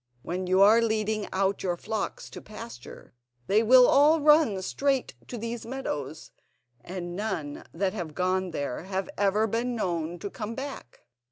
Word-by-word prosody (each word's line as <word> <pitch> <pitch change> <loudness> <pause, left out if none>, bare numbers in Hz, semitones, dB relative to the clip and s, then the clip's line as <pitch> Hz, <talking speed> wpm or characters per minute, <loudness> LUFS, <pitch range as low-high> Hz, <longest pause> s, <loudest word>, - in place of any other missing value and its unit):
When 180 +2 -3
you 185 +2 +5
are 220 +3 +6
leading 215 -2 0
out 195 +1 0
your 175 -2 -1
flocks 215 +3 -4
to - - -9
pasture, 215 - -11 0.3
they 210 +3 +3
will 250 +2 +7
all 300 +3 +5
run 300 -9 +5
straight 275 +4 0
to 245 - -6
these 230 +1 -5
meadows, 160 - -5 0.5
and 175 -1 -6
none 185 -8 -4
that 190 +2 -1
have 170 -7 -5
gone 185 0 0
there 145 -1 -4
have 190 -1 -3
ever 205 +2 +2
been 235 +3 -1
known 175 -5 -2
to 200 +4 -6
come 220 0 -5
back. 270 - -7
200 Hz, 160 wpm, -27 LUFS, 180-230 Hz, 0.5 s, will